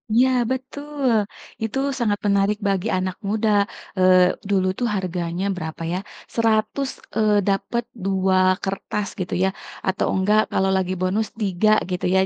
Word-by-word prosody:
Iya, 255 +2 +5 0.2
betul! 280 0 -2 0.5
Itu 225 +3 -2 0.2
sangat 205 -3 +1
menarik 200 +1 +2
bagi 195 +2 0
anak 185 0 -2
muda, 220 +1 +1 0.5
eee, 185 -1 +6 0.2
dulu 190 -2 +2
tuh, 240 - +1
harganya 180 -1 -2
berapa 160 -1 -6
ya, - - 0 0.4
Rp100, 230 +4 +1 0.3
eee, 210 -2 +3
dapat 200 +5 0 0.2
2 190 -1 +2 0.3
kertas 195 +1 -3
gitu 185 - -3
ya, 190 - +3 0.4
atau 190 - +1
enggak 210 +3 +4
kalau 190 0 +2
lagi 185 0 -1
bonus, 200 +4 +1
3, 205 +1 +2 0.2
gitu 180 - -2
ya. - - +5
195 Hz, 140 wpm, -22 LUFS, 185-220 Hz, 0.5 s, eee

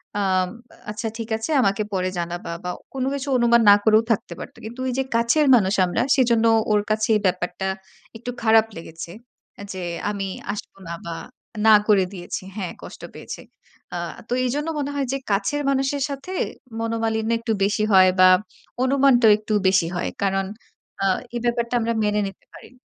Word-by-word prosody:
অ্যাম 185 -2 +1 0.3
আ - - -20
"আচ্ছা 220 +2 -4
ঠিক 230 0 -6
আছে, 225 +8 -4
আমাকে 200 -2 +1
পরে 185 -1 0
জানাবা" 170 0 -4
বা 180 - -2 0.2
কোনো 265 -1 -2
কিছু 280 0 -4
অনুমান 235 0 +4
না 205 - +10
করেও 220 0 +5
থাকতে 200 -5 -1
পারত। - - -9
কিন্তু 240 +4 -7
এই - - -2
যে, 265 - +2
কাছের 235 +6 +3
মানুষ 195 -4 +2
আমরা, 180 - -1
সেজন্য 235 -3 +3 0.3
ওর 210 -1 +4
কাছে 215 0 +1
এই 210 - +1
ব্যাপারটা 185 +1 -1 0.5
একটু 245 +2 -6
খারাপ 225 -1 +5
লেগেছে। 165 0 -8 0.5
আ - - -7
যে, 185 - -5 0.3
আমি 200 -1 -3 0.3
আসব 210 - -8
না 170 - -4
বা 170 -1 -4 0.5
না 220 - +9
করে 200 -3 +5
দিয়েছি 180 0 -6
হ্যাঁ, 190 -5 -4
কষ্ট - - -10
পেয়েছে। - - -8 0.5
আ - - -2 0.3
তো - - -2
এইজন্য 295 +5 -1
মনে 285 0 -2
হয় 275 -2 -1
যে, 275 - 0
কাছের 200 +9 0
মানুষের 270 +1 0
সাথে, 280 +7 -6 0.5
মনোমালিন্য 225 0 -1
একটু 230 -1 -1
বেশি 205 +2 +1
হয় 185 -1 +7
বা 185 0 +8 0.5
অনুমানটা 260 -3 +4
একটু 215 0 -4
বেশি 185 -3 +3
হয়। 175 - -1
কারণ 195 0 +1 0.6
আ - - +2 0.3
এই - - -1
ব্যাপারটা 235 0 0
আমরা 230 0 0
মেনে 210 0 +1
নিতে 195 - -12
পারি - - -13
না - - -25
220 Hz, 180 wpm, -23 LUFS, 190-240 Hz, 0.6 s, না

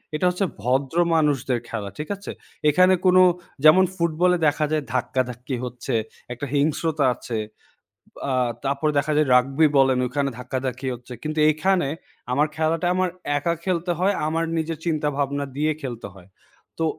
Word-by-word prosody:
এটা 155 - 0
হচ্ছে 180 +2 -1 0.2
ভদ্র 130 +6 0 0.2
মানুষদের 140 -5 +1
খেলা 105 -3 -4
ঠিক 150 - -6
আছে? 200 0 -8 0.4
এখানে 185 +5 +5
কোনো 185 0 +6 0.4
যেমন 155 +5 +7
ফুটবলে 175 +1 +2
দেখা 150 +1 +1
যায় 155 -1 0
ধাক্কাধাক্কি 130 0 -2
হচ্ছে, 125 +1 -5 0.4
একটা 125 +4 -5
হিংস্রতা 150 +1 +1
আছে, 115 -1 -5 0.9
আ - - +1 0.3
তারপরে 140 +3 0
দেখা 150 +2 0
যায় 150 0 +3
রাগবি 135 +5 +4
বলেন 135 -1 +4
ওইখানে 140 +2 -1
ধাক্কাধাক্কি 130 +1 -4
হচ্ছে। 125 +1 -12
কিন্তু 155 0 -3
এইখানে 175 +1 +2 0.4
আমার 145 +4 +3
খেলাটা 160 +2 0
আমার 185 0 +1 0.3
একা 170 +4 0
খেলতে 180 -1 -1
হয়, 195 +3 +2
আমার 165 +1 0
নিজের 160 0 -2
চিন্তাভাবনা 145 -3 -1
দিয়ে 155 +2 +1
খেলতে 120 -5 -5
হয়। 95 -2 -16 0.5
তো 165 - 0
150 Hz, 150 wpm, -23 LUFS, 130-165 Hz, 0.9 s, যেমন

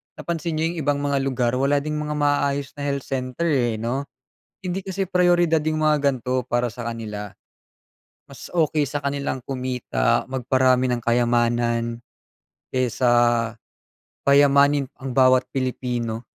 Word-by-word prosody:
napansin 165 -1 -3
niyo 155 - -1
'yong 175 - -8
ibang 145 -1 0
mga 140 -1 +1
lugar 130 -3 0
wala 140 +1 +2
ding 150 0 -3
mga 150 0 -3
maaayos 145 -1 0
na - - -6
health 140 -1 -2
center, 130 +5 -3
eh, 120 -5 +1
'no. 120 +6 -3 0.6
Hindi 185 +1 -3
kasi 190 0 -3
prayoridad 175 -3 +3
'yong 155 0 -1
mga 155 -1 +3
ganito 130 0 -2
para 120 +1 +1
sa 120 - -7
kanila. 105 -3 -6 1.0
Mas - - -11
okay 155 -3 +1
sa 145 - -2
kanilang 140 -1 -2
kumita, 125 - -1
magparami 130 0 +2
ng 120 -1 -1
kayamanan, 120 0 +1 0.7
kaysa 130 0 +1 1.2
payamanin 140 0 +4
ang 135 -2 -6
bawat 130 -1 +4
Pilipino. 125 -3 -2
135 Hz, 135 wpm, -23 LUFS, 125-145 Hz, 1.2 s, payamanin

